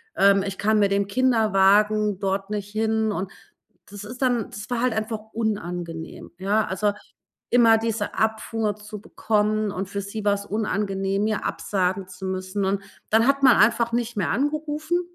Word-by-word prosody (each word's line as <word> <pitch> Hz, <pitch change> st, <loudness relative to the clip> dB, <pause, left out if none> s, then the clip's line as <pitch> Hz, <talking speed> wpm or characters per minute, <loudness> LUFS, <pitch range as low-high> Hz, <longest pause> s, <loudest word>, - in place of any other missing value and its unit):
ähm: 200 Hz, 0 st, +5 dB
„Ich 195 Hz, -1 st, -4 dB
kann 215 Hz, +1 st, +2 dB
mit 200 Hz, -1 st, +3 dB
dem 200 Hz, 0 st, +2 dB
Kinderwagen 210 Hz, -3 st, +3 dB
dort 195 Hz, 0 st, -2 dB
nicht 205 Hz, -1 st, -4 dB
hin." 220 Hz, 0 st, 0 dB
Und 195 Hz, -1 st, -4 dB, 0.6 s
das 205 Hz, 0 st, -8 dB
ist 245 Hz, +4 st, -9 dB
dann 245 Hz, -4 st, +1 dB
das 205 Hz, +1 st, -8 dB
war 240 Hz, -1 st, 0 dB
halt 250 Hz, -1 st, +1 dB
einfach 220 Hz, 0 st, -2 dB
unangenehm, 175 Hz, -7 st, -4 dB
ja? 205 Hz, +3 st, +1 dB
Also, 205 Hz, +2 st, 0 dB, 0.6 s
immer 230 Hz, -2 st, +6 dB
diese 225 Hz, -2 st, -2 dB
Abfuhr 220 Hz, -1 st, -1 dB
zu 210 Hz, 0 st, -9 dB
bekommen, 215 Hz, 0 st, 0 dB
und 190 Hz, 0 st, -4 dB
für 200 Hz, 0 st, -4 dB
sie 205 Hz, +2 st, -6 dB
war's 200 Hz, 0 st, +1 dB
unangenehm, 200 Hz, -1 st, -1 dB
mir 215 Hz, -1 st, -1 dB
absagen 190 Hz, -1 st, -1 dB
zu 185 Hz, +1 st, -8 dB
müssen. 185 Hz, +1 st, -3 dB
Und 195 Hz, +1 st, 0 dB, 0.3 s
dann 225 Hz, +2 st, +4 dB
hat 275 Hz, 0 st, +2 dB
man 260 Hz, -2 st, +7 dB
einfach 230 Hz, +1 st, +3 dB
nicht 240 Hz, 0 st, -1 dB
mehr 200 Hz, -4 st, 0 dB
angerufen, 305 Hz, +4 st, -1 dB
210 Hz, 165 wpm, -24 LUFS, 195-225 Hz, 0.6 s, man